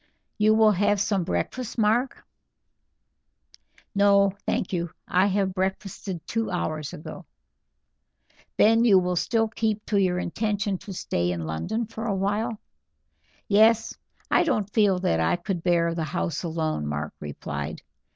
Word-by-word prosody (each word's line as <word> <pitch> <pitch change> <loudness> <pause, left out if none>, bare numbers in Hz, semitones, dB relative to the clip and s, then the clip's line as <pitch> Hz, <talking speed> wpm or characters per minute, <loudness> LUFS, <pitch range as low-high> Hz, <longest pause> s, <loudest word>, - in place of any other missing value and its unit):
"You 215 +1 +5
will 220 -1 +6
have 205 +1 +2
some 200 -2 +1
breakfast, 245 +7 -3
Mark?" 230 +4 +1 1.7
"No, 200 -1 +4 0.2
thank 190 - -1
you. 170 -1 -1 0.2
I 185 +2 +3 0.2
breakfasted 190 -1 -4
two 225 -1 -2
hours 155 -5 -3
ago." 150 - -9 1.3
"Then 225 +2 +5
you 185 -5 +4
still 225 +5 +1
keep 215 -1 -2
to 205 - 0
your 180 -2 +1
intention 205 +1 -1
to 200 - -9
stay 90 - -1
in 85 -2 -3
London 80 - -2
for 225 +1 -6
a 200 - 0
while?" 210 +4 -1 0.9
"Yes. 220 +2 +4 0.4
I - - +5
don't 210 - -1
feel 205 -4 +4
that 180 - 0
I 80 - +2
could 175 0 -4
bear 170 -1 +2
the 165 -1 -2
house 170 -1 -2
alone," 160 - -2
Mark 75 +1 -3
replied. 75 -2 -6
195 Hz, 135 wpm, -25 LUFS, 170-215 Hz, 1.7 s, will